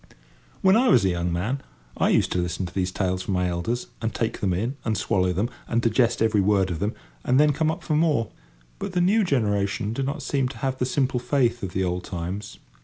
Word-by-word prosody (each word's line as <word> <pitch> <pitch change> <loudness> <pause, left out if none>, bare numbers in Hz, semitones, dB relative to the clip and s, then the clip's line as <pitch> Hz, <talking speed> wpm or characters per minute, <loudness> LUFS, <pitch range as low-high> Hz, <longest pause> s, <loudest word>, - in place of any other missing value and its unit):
When 190 +1 +5
I 250 +2 +4
was 115 - +5
a - - +3
young 85 0 -1
man, 110 +11 -1 0.3
I - - +2
used - - +2
to 90 - 0
listen 90 +1 -2
to 90 - -8
these 95 -1 -1
tales 95 -1 -1
from 95 0 -2
my 90 0 +1
elders, 90 +8 -2 0.2
and 115 0 -1
take 115 -1 -2
them 95 - 0
in, 115 +10 -1
and 110 -2 0
swallow 90 -1 +1
them, 100 +6 0 0.2
and 115 - +1
digest 115 0 +2
every 110 -2 +3
word 95 -2 +2
of 80 - -3
them, 105 +5 -1 0.3
and 130 +2 +3
then 150 0 +5
come 155 +2 +1
up 160 - -3
for 155 - 0
more; 150 -8 +2 0.5
but - - -4
the 180 - +1
new 200 +5 +4
generation 105 - 0
do 135 - -2
not 140 +2 -3
seem 135 -2 0
to 135 - -8
have 130 -1 -2
the 125 - +1
simple 130 -1 0
faith 125 -2 +1
of 95 -2 -5
the 95 - 0
old 90 0 -2
times. 90 +4 -5
110 Hz, 240 wpm, -25 LUFS, 95-135 Hz, 0.5 s, When